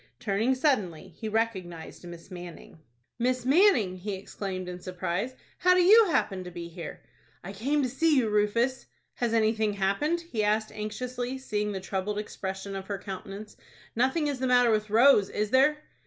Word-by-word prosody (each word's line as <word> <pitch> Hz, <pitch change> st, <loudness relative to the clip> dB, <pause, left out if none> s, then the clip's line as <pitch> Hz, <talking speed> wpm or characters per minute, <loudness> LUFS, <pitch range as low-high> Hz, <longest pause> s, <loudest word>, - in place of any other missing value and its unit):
Turning 220 Hz, +5 st, +1 dB
suddenly, 195 Hz, -, 0 dB
he 215 Hz, +6 st, -7 dB
recognized 190 Hz, -7 st, -3 dB
Miss 170 Hz, +2 st, -11 dB
Manning. 175 Hz, -2 st, -10 dB, 0.4 s
"Miss 250 Hz, +1 st, 0 dB
Manning!" 265 Hz, -, +4 dB
he 195 Hz, +2 st, -4 dB
exclaimed, 190 Hz, -1 st, -6 dB
in 180 Hz, 0 st, -6 dB
surprise. 185 Hz, +6 st, -3 dB, 0.2 s
"How 365 Hz, 0 st, +5 dB
do 365 Hz, -, +5 dB
you 435 Hz, +5 st, +8 dB
happen 195 Hz, -, 0 dB
to 180 Hz, -, -7 dB
be 170 Hz, -1 st, -7 dB
here?" 170 Hz, -1 st, -8 dB, 0.4 s
"I 195 Hz, +3 st, -7 dB
came 275 Hz, +8 st, 0 dB
to -, -, +1 dB
see 300 Hz, +4 st, +2 dB
you, 245 Hz, -4 st, +3 dB
Rufus." 215 Hz, +5 st, +1 dB, 0.3 s
"Has 240 Hz, -2 st, -1 dB
anything 220 Hz, -1 st, +2 dB
happened?" 200 Hz, -, 0 dB
he 250 Hz, -11 st, -3 dB
asked 215 Hz, +1 st, +1 dB
anxiously, 245 Hz, +4 st, -4 dB
seeing 210 Hz, -5 st, -2 dB
the 195 Hz, -, -3 dB
troubled 190 Hz, +2 st, -3 dB
expression 195 Hz, -1 st, -5 dB
of 190 Hz, 0 st, -6 dB
her 200 Hz, -, -3 dB
countenance. 195 Hz, +2 st, -8 dB, 0.4 s
"Nothing 265 Hz, +7 st, +1 dB
is 285 Hz, -3 st, -2 dB
the 260 Hz, -, 0 dB
matter 245 Hz, -2 st, +5 dB
with 215 Hz, -1 st, 0 dB
Rose, 225 Hz, -2 st, +5 dB
is 210 Hz, 0 st, -2 dB
there?" 275 Hz, +3 st, +4 dB
215 Hz, 170 wpm, -28 LUFS, 190-255 Hz, 0.4 s, you